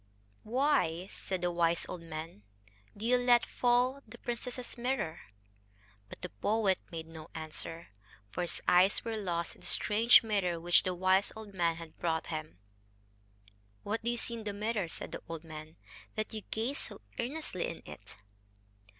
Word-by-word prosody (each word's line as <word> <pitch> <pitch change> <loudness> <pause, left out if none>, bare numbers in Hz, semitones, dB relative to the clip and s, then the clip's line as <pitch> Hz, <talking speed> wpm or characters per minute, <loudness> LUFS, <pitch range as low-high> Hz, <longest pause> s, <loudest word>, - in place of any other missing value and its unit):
"Why," 225 - +2
said 190 -2 -4
the 175 - +2
wise 170 -1 +2
old 175 - -5
man, 160 -7 -7 0.6
"do 210 - -5
you 250 +2 +5
let 245 -1 +5
fall 250 +2 +2
the 230 +3 -11
princess's 245 +1 -4
mirror?" 240 -9 -1 0.9
But - - -11
the - - -3
poet 195 - +2
made 165 -1 -5
no 160 0 -10
answer 165 +1 -5 0.4
for 180 - -2
his 175 - -1
eyes 185 +5 +5
were 225 -1 -1
lost 175 -5 -1
in - - -19
the - - -4
strange 225 +4 +6
mirror 195 -6 +1
which 175 +1 +5
the 185 -1 -1
wise 185 +2 +3
old 220 -2 -9
man 170 -3 +2
had 165 -1 -10
brought 160 -2 0
him. 155 -9 -5 1.3
"What 220 +2 -1
do 235 - -1
you 240 - 0
see 235 - -3
in 230 -1 -5
the 205 -1 -3
mirror," 210 -2 -1
said - - -5
the - - -5
old 165 -1 -5
man, 155 0 -9 0.4
"that 215 0 -2
you 215 - -4
gaze 240 +6 -1
so - - -3 0.2
earnestly 245 - -2
in - - -7
it?" - - -10
190 Hz, 170 wpm, -33 LUFS, 165-235 Hz, 1.3 s, strange